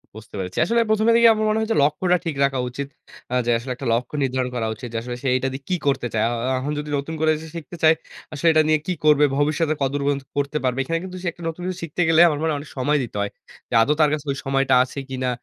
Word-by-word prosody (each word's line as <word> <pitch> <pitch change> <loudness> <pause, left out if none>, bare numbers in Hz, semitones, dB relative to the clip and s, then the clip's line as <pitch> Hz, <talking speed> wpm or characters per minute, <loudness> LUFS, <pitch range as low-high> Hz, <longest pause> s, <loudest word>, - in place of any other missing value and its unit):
বুঝতে 110 -1 -11
পেরেছি। 95 0 -5
আসলে 235 +1 +2
১ম 215 0 +2
এ - - +6
দেখেই 235 0 +7
আমার 215 0 -1
মনে 215 - +1
হচ্ছে 220 +1 0
লক্ষ্যটা 180 +5 +2
ঠিক 165 -3 -2
রাখা 135 -1 +1
উচিত। 140 +3 -5 0.4
আ - - -2
যে, 120 - +2
আসলে 120 +3 -6
একটা 130 0 -6
লক্ষ্য 125 +5 -2
নির্ধারণ 130 -1 -1
করা 115 -2 -1
উচিত। 120 +3 -8
যে, - - -2
আসলে 120 +1 -5
সে - - -1
এইটা 130 +1 0
দিয়ে 135 +1 -7
কী 185 - +2
করতে 135 -3 +1
চায়? 110 -1 +1
আ - - -2 0.2
আ - - +1
এখন 140 +3 -3
যদি 150 0 -6
নতুন 140 +3 -4
করে 160 0 +4
সে 160 - -9
শিখতে 165 +1 -7
চায়, 160 0 +6 0.4
আসলে 155 +3 -1
এটা 155 - +5
নিয়ে 155 0 +3
কি 185 - +1
করবে 150 -1 +6
ভবিষ্যতে? 150 +2 +1
কত 135 - +2
দূর 145 - -1
পর্যন্ত 140 -1 0
করতে 145 +1 0
পারবে? 130 0 0
এখানে 165 +5 -1
কিন্তু 185 0 -8
সে - - -2
একটা 170 - -13
নতুন 165 +2 -8
কিছু 185 -1 -3
শিখতে 165 +2 -3
গেলে 165 0 +5
আমার 150 - -1
মনে 160 - +1
হয় 150 - -1
অনেক 145 - -10
সময় 145 +4 +2
দিতে 120 - -8
হয়। 100 - -2 0.4
যে, - - -8
আদৌ 140 +6 +3
তার 150 - +5
কাছে 155 -1 -3
ওই 135 - -4
সময়টা 135 0 +1
আছে 130 +2 -7
কিনা? 130 -1 -2
145 Hz, 280 wpm, -22 LUFS, 130-160 Hz, 0.4 s, দেখেই